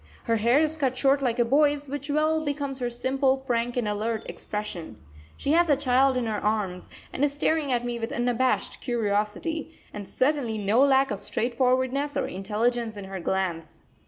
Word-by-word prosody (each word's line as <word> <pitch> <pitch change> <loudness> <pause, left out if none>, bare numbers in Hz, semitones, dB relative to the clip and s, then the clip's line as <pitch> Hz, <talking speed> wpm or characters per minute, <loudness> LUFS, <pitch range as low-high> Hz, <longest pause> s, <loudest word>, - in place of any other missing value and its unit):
Her 230 - +1
hair 235 +5 +3
is 315 0 +1
cut 260 -4 0
short 275 +1 +3
like 245 -3 0
a 240 - +3
boy's, 290 +3 +2
which 285 +1 -6
well 310 +2 +1
becomes 285 -2 -3
her 245 -1 -1
simple, 265 +2 0
frank, 240 0 -1
and 240 -3 0
alert 220 +2 -2
expression. 185 - -6 0.4
She 280 - -1
has 340 +1 +4
a 285 - +4
child 260 0 +3
in 250 - -1
her 215 -2 -3
arms 205 -4 -1 0.2
and 270 - -1
is 290 -1 +2
staring 290 0 0
at 245 -1 0
me 240 -1 -3
with 225 0 -4
unabashed 245 +1 0
curiosity, 235 +8 -2
and 205 -2 -7
certainly 260 -5 0
no 210 +4 +2
lack 270 -2 +4
of 205 - -3
straightforwardness 260 +5 0
or - - 0
intelligence 220 +3 -1
in 200 - -6
her 190 0 -6
glance. 170 -3 -2
245 Hz, 185 wpm, -26 LUFS, 220-280 Hz, 0.4 s, has